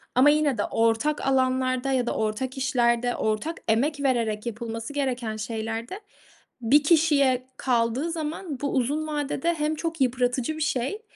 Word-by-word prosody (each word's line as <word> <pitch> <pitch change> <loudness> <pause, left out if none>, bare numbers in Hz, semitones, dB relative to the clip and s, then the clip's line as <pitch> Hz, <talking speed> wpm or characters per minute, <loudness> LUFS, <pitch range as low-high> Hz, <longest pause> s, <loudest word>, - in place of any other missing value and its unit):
Ama 260 +4 +6
yine 295 -4 +2
de 205 - +1
ortak 230 +7 +1
alanlarda 260 0 +1
ya 255 -2 +1
da - - -1
ortak 220 +5 -2
işlerde 245 -2 +1
ortak 220 +10 -1
emek 280 +7 +1
vererek 230 -5 0
yapılması 230 +2 -5
gereken 250 -6 -2
şeylerde 225 - -4 0.6
bir 280 +6 +4
kişiye 285 -5 +3
kaldığı 245 +5 0
zaman 315 -2 -4
bu 280 - -1
uzun 285 +4 0
vadede 295 +2 -1
hem 305 0 -1
çok 330 -1 -4
yıpratıcı 250 +3 0
bir - - -6
şey, 300 - -1
260 Hz, 145 wpm, -25 LUFS, 235-295 Hz, 0.6 s, Ama